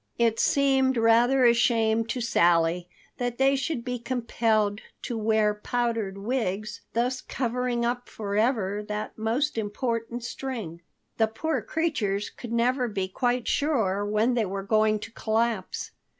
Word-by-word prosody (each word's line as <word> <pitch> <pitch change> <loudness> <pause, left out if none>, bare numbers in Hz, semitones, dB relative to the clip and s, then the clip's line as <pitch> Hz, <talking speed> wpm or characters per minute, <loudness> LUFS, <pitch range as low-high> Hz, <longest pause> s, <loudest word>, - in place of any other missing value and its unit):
It 230 -1 +2
seemed 265 -2 +3
rather 240 +3 +4
a 235 - +7
shame 225 -1 +2
to 250 +2 -2
Sally 175 -5 +2 0.3
that 245 -1 -2
they 270 +1 +4
should 275 -3 -2
be 250 -1 -3
compelled 230 -4 0 0.2
to 240 - -3
wear 220 -1 +2
powdered 225 -2 -2
wigs, 215 -2 -2
thus 250 +2 0
covering 245 -1 -1
up 245 +1 -2
forever 210 -1 0
that 210 0 -4
most 230 +4 0
important 230 +2 -3
string. 230 -10 -5 0.4
The 220 - +3
poor 310 +9 -2
creatures 235 -12 -1
could 240 - -9
never 245 +2 +1
be 195 -4 -2
quite 245 +4 -1
sure 220 -10 +1
when 215 +4 +1
they 235 -3 +1
were 195 +1 -4
going 215 +1 +3
to 225 - -8
collapse. 225 -3 -1
230 Hz, 140 wpm, -26 LUFS, 210-245 Hz, 0.4 s, a